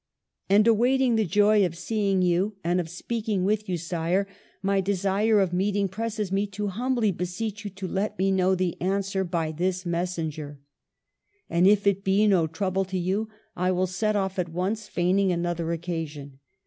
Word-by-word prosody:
And 205 +2 +5
awaiting 245 +2 +3
the 220 -1 +2
joy 205 +3 +4
of 170 -2 -1
seeing 200 -2 0
you 180 +4 +1
and 175 +2 +1
of 165 - -8
speaking 210 +2 -2
with 215 0 0
you. 180 - 0
Sire, 170 +3 -1 0.4
my 195 0 +2
desire 200 +3 +2
of 190 -3 +1
meeting 200 +2 +1
presses 215 0 -3
me 200 +1 +1
to 205 +1 -4
humbly 235 +1 0
beseech 195 +4 -4
you 205 - -4
to 195 0 -6
let 205 +3 -2
me 195 +1 +2
know 190 0 +3
the 185 -1 -2
answer 195 +1 0
by 170 -3 -2
this 185 +3 -2
messenger. 165 -4 -3 0.9
And 175 +2 +4
if 200 0 +4
it 195 -1 +2
be 195 +2 +3
no 185 -6 +3
trouble 190 +3 -1
to 190 0 -4
you, 195 +5 -1 0.3
I 180 +1 +1
will 185 0 +1
set 210 +4 -1
off 190 -1 -1
at 175 -1 -1
once, 195 +6 -2
feigning 185 +2 +1
another 170 -1 -1
occasion. 160 -5 -5
190 Hz, 175 wpm, -26 LUFS, 175-205 Hz, 0.9 s, And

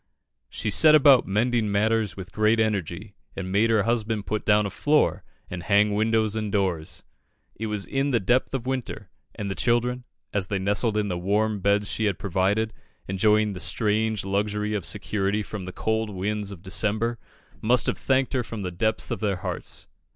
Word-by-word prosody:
"She 105 - -3
set 155 +8 +7
about 140 -4 +6
mending 110 +2 +1
matters 110 +1 +1
with 90 -2 -8
great 110 +2 +2
energy, 100 -2 -2 0.2
and 95 -1 -5
made 105 +4 +3
her 110 -3 +3
husband 110 -2 -1
put 110 0 -3
down 105 0 +4
a 100 - -3
floor, 150 0 +1 0.2
and 90 -1 -6
hang 105 +4 +3
windows 110 0 +1
and 110 -2 -2
doors." 95 -6 -1 0.5
It 110 - -5
was 105 -2 -2
in 135 +1 -1
the 120 -4 +2
depth 125 +6 +1
of 125 -2 -4
winter, 130 -6 -4 0.2
and 105 - -4
the 95 - -2
children, 120 +3 0 0.3
as 100 -2 -1
they 100 - -1
nestled 105 +3 +1
in 105 -1 0
the 90 -3 -3
warm 105 +3 0
beds 100 +1 +1
she 110 - -1
had 100 -5 0
provided, 100 +5 0 0.3
enjoying 105 +2 +2
the 90 - -7
strange 110 0 +1
luxury 105 +2 -1
of 100 -5 -2
security 105 0 -1
from 100 -2 -7
the 95 - -6
cold 110 +2 -1
winds 105 +1 -3
of 95 -3 -10
December, 110 +4 0 0.4
must 120 +3 +3
have - - -1
thanked 135 0 +1
her 130 - +1
from 115 -3 -6
the 90 - -3
depths 110 +5 -1
of - - -2
their 105 -3 0
hearts. 90 -2 -4
105 Hz, 190 wpm, -25 LUFS, 100-110 Hz, 0.5 s, set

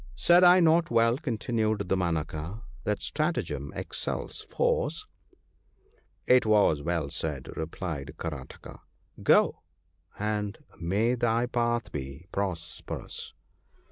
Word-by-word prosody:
' - - -19
Said 175 +1 +5
I 180 +1 +8
not 165 0 +4
well,' 115 +2 +3
continued 110 -5 -1
Damanaka, 85 +2 -2
* - - -20
that 105 -1 -1
stratagem 155 +3 -2
excels - - -3
force? 485 -3 0 0.6
' 410 +3 -38
'It 125 0 +6
was 105 -9 +4
well 80 -3 -1
said/ 75 -3 -3
replied 80 -2 -5
Karataka: 75 -6 -7 0.4
'go! - - +4 0.6
and 105 0 -2 0.2
may 100 +8 +1
thy 120 -1 +1
path 120 -1 0
be 70 +3 -6
prosperous 90 -4 -5
105 Hz, 110 wpm, -28 LUFS, 80-120 Hz, 0.6 s, I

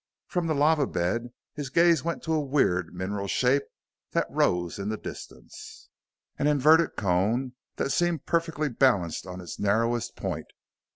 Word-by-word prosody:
From 175 -3 -2
the 155 - 0
lava 150 -1 +3
bed 115 +8 -2 0.2
his 145 -3 -5
gaze 170 -1 +4
went 170 0 -3
to 160 - -1
a 155 - +2
weird 130 - +1
mineral 100 +2 -4
shape 130 +6 +2 0.5
that - - +2
rose 90 +1 0
in 100 +1 -3
the 110 - -2
distance - - -10 0.5
an 145 - +2
inverted 150 +3 +4
cone 105 +7 0 0.2
that 135 - -1
seemed 175 -3 0
perfectly 165 -2 0
balanced 110 - +1
on 90 0 -7
its 85 - -8
narrowest 115 +3 0
point. - - -4
130 Hz, 155 wpm, -27 LUFS, 100-155 Hz, 0.5 s, gaze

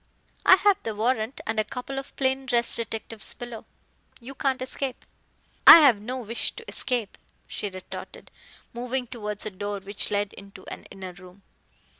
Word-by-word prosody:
"I - - +10
have 405 +1 +3
the 220 -2 -4
warrant 225 +2 0
and 220 0 -1
a - - +3
couple 270 +4 -5
of 270 - -11
plain 265 0 0
dress 240 -2 +2
detectives 225 -1 -4
below. 240 -2 -8 0.5
You 255 +2 -9
can't 270 0 0
escape." 260 0 -4 0.6
"I - - +14
have 245 -9 +5
no 250 +4 -4
wish 230 -1 -3
to 460 - -11
escape," 240 -6 -1 0.3
she 205 - -3
retorted, 185 -1 -9 0.4
moving 250 +2 -2
towards 210 -4 -4
a 215 - -3
door 205 +1 -4
which 200 +1 -3
led 205 -1 -1
into 195 -1 -13
an - - -11
inner 190 -2 -8
room. 185 +1 -15
230 Hz, 165 wpm, -26 LUFS, 205-260 Hz, 0.6 s, I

